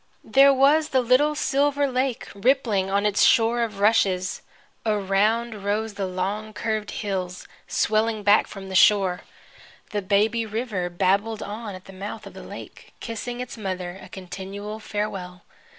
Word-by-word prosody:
There 275 +1 +6
was 285 +4 +4
the 260 - +3
little 260 +5 +3
silver 285 0 +1
lake, 255 -1 -1
rippling 215 -3 +1
on 200 +1 +1
its 205 -1 +2
shore 230 +1 +4
of 215 -4 -3
rushes. 195 -3 +2 0.4
Around 210 +1 0
rose 210 +2 -1
the 200 -1 -3
long 200 +4 -3
curved 215 -2 -2
hills, 185 -4 -4 0.2
swelling 215 0 +1
back 205 +1 +5
from 195 -1 -9
the - - -6
shore. 190 -1 +4 0.7
The 205 - -1
baby 210 +4 +2
river 215 -5 -3
babbled 200 +5 0
on 210 -1 -6
at 185 - -12
the 195 - -12
mouth 205 +3 -7
of - - -10
the - - -10
lake, - - -11
kissing 240 +2 -5
its 245 -2 -7
mother 185 -2 -4
a - - -12
continual 195 +3 -7
farewell. 195 -4 -5
210 Hz, 150 wpm, -24 LUFS, 195-230 Hz, 0.7 s, There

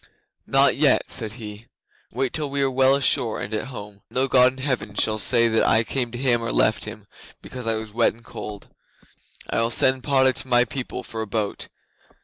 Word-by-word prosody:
'"Not - - +4
yet," - - +3
said 110 -2 -4
he. 110 -1 -9 0.4
"Wait 130 +1 -2
till 150 -2 -1
we 140 0 0
are 135 - +1
well 130 +1 +4
ashore 130 -4 +1
and 105 - -5
at 110 +4 -2
home. 105 -5 -10
No 130 +1 +1
God 125 -1 +5
in - - -15
any 130 - -5
Heaven 115 -7 -2
shall 110 +1 +1
say 115 +1 +3
that 110 0 +2
I 115 +1 +4
came 125 +1 -2
to 120 - -6
him 120 -2 +1
or 115 - -2
left 110 - +2
him 105 -1 -9 0.4
because 125 -2 -7
I 115 - +2
was 110 -1 -6
wet 115 0 +2
and 115 - -19
cold. 105 -1 -8 0.8
I - - +1
will 115 - +1
send 130 +2 +2
Padda 130 -2 +3
to 130 - -4
my 125 -1 +4
people 130 -1 -5
for 110 - -6
a 110 - -4
boat. 105 0 -2
120 Hz, 215 wpm, -23 LUFS, 110-130 Hz, 0.8 s, God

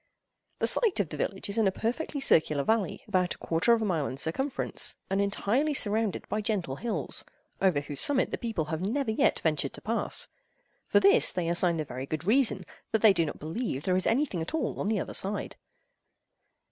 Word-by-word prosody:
The - - 0
site 440 - +4
of 190 -7 0
the 150 - -6
village 195 +6 -3
is 205 +3 0
in 215 - +3
a - - +2
perfectly 250 +9 -3
circular 155 - +3
valley, 220 -2 0
about 185 -3 0
a - - -20
quarter 165 +8 +1
of 230 -1 +3
a - - 0
mile 165 -8 0
in 130 - -6
circumference, 260 - 0 0.2
and 195 +1 +2
entirely 230 +9 0
surrounded 215 -3 +1
by 215 - -2
gentle 195 - -2
hills, 235 -1 -2 0.4
over 185 -7 +3
whose 145 -1 -3
summit 280 -3 +1
the - - -2
people 225 -10 -2
have 160 +2 -4
never 230 +5 -1
yet 220 - +1
ventured 150 -4 0
to - - -8
pass. 230 +1 -1 0.6
For - - +4
this 400 +5 +5
they 175 -2 -2
assign 170 0 +2
the 155 - -2
very 130 0 -6
good 155 +3 -4
reason 215 -4 +2 0.3
that 220 -1 0
they 215 -3 +8
do 165 -3 +1
not - - -6
believe 160 - -4
there 185 - +1
is 185 - +1
anything 240 - 0
at 160 - -4
all 320 - -2
on - - -2
the 215 -2 +1
other - - -5
side. 200 +1 -2
200 Hz, 210 wpm, -28 LUFS, 165-230 Hz, 0.6 s, they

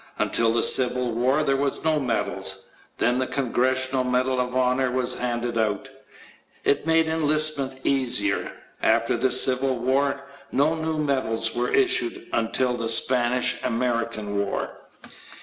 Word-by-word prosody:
Until 115 -1 +2
the 115 0 +1
Civil 125 -1 +3
War 130 +6 +1
there 135 -2 +1
were 140 +1 +1 0.2
no 155 -1 +2
medals. 95 -6 -3 0.3
Then 120 +2 +1
the 130 - -1
Congressional 130 0 0
Medal 125 +1 0
of 125 0 -2
Honor 130 0 +1
was 125 0 -1
handed 120 -1 -2
out. 110 +5 -2 0.7
It 145 - +1
made 165 0 +4
enlistments 155 -3 +1
easier. 125 -7 0 0.3
After - - +2
the 125 +3 +1
Civil 130 +1 +3
War 140 +3 0 0.3
no 150 +3 +2
new 160 -1 -3
medals 130 -7 -1
were 120 +1 -1
issued 365 -1 0
until 130 - +1
the 115 -1 -3
Spanish 125 +1 +2
American 115 -4 -2
War. 100 -1 -2
130 Hz, 135 wpm, -24 LUFS, 120-140 Hz, 0.7 s, made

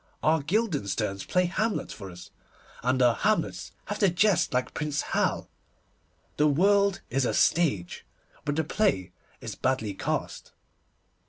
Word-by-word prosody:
Our 160 0 +3
Guildensterns 140 - -1
play 180 0 +2
Hamlet 215 +5 -1
for 100 -3 -8
us, 90 0 -12 0.5
and 130 +2 +1
our 120 -1 +5
Hamlets 215 - -1
have - - -4
to 200 - +4
jest 185 +2 +2
like 125 0 -1
Prince 150 -1 -2
Hal. - - 0 0.9
The 150 - +4
world 200 +6 +3
is 135 +2 +1
a - - 0
stage, 135 - +1 0.4
but 145 0 -1
the 160 - +1
play 145 - 0 0.3
is - - -5
badly 130 -6 -1
cast. - - -4
150 Hz, 140 wpm, -27 LUFS, 120-185 Hz, 0.9 s, our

